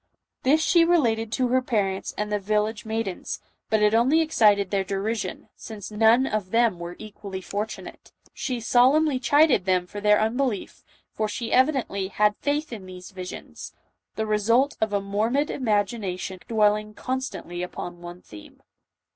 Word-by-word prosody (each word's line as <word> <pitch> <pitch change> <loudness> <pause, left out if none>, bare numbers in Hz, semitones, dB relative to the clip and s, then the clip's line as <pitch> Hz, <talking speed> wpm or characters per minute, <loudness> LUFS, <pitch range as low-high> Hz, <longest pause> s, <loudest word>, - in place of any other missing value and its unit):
This 305 +5 +3
she 340 +1 +5
related 230 -11 +2
to 255 -1 +1
her 255 +1 +3
parents 200 -6 -1
and 210 0 -2
the 210 - +1
village 215 +2 -1
maidens, 220 -4 -3 0.3
but 215 -1 +2
it 210 0 +4
only 255 +8 +4
excited 210 - +3
their 195 -1 +1
derision, 195 +1 -3
since 215 -2 -9
none 225 +4 +4
of 215 -7 -2
them 230 -4 +2
were 170 +1 -6
equally 200 -3 -8
fortunate. 205 +4 -6 0.2
She 250 -3 -3
solemnly 260 +4 +4
chided 285 - +4
them 185 -1 +2
for 205 +3 -8
their 210 0 +4
unbelief, 225 0 -1 0.3
for 215 - -2
she 225 +2 -4
evidently 255 -8 +2
had 210 +2 +2
faith 290 -1 -2
in 195 -4 -8
these 185 +1 -10
visions 185 -1 -8 0.2
— - - -55
the 220 - -1
result 230 +6 +2
of 220 -1 +1
a 200 -1 0
morbid 220 +9 0
imagination, 205 -5 -1
dwelling 210 -1 +1
constantly 255 -10 -4
upon 175 -1 -6
one 175 +1 -10
theme. 105 -1 -14
215 Hz, 155 wpm, -25 LUFS, 195-245 Hz, 0.3 s, she